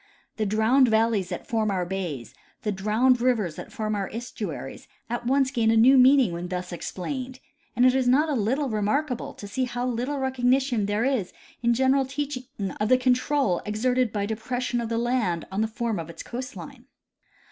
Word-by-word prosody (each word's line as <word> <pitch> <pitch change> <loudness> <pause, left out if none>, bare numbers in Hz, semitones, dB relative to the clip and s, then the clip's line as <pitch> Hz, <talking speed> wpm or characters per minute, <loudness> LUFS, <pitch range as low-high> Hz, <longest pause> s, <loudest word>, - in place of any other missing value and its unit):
The 215 -2 0
drowned 220 +6 +4
valleys 220 -4 +2
that 175 - -5
form 220 -2 0
our 185 -3 -1
bays, 175 -10 -5 0.3
the 210 - 0
drowned 220 +6 +2
rivers 220 -10 +1
that - - -8
form 215 -4 -3
our 200 -2 -2
estuaries, 210 - -6 0.2
at 240 0 -3
once 270 0 +2
gain 230 -5 +1
a 225 - +4
new 250 +5 +7
meaning 260 -3 +6
when 170 +1 -5
thus 180 0 -4
explained; 255 +9 -5 0.4
and 245 - +4
it 255 - +6
is 260 -1 +1
not 280 +6 +4
a 305 - -1
little 265 +5 0
remark 235 +6 0
able 245 - -5
to 205 - -9
see 255 +6 -1
how 245 0 -3
little 250 +4 -2
recognition 260 -3 +1
there 210 +3 0
is 255 -9 -1 0.3
in 235 0 +2
general 265 +1 +2
teaching 275 -2 -4 0.3
of 210 +1 0
the 255 - +6
control 255 -5 +1
exerted 245 +3 0
by 205 -2 -1
depression 240 +3 -2
of 230 - -4
the 230 - -1
land 230 -8 0
on 195 +3 -1
the 220 - +1
form 225 -2 -2
of 165 0 -6
its 165 - -8
coast 255 +1 -6
line. 265 -3 -10
235 Hz, 195 wpm, -25 LUFS, 210-255 Hz, 0.4 s, new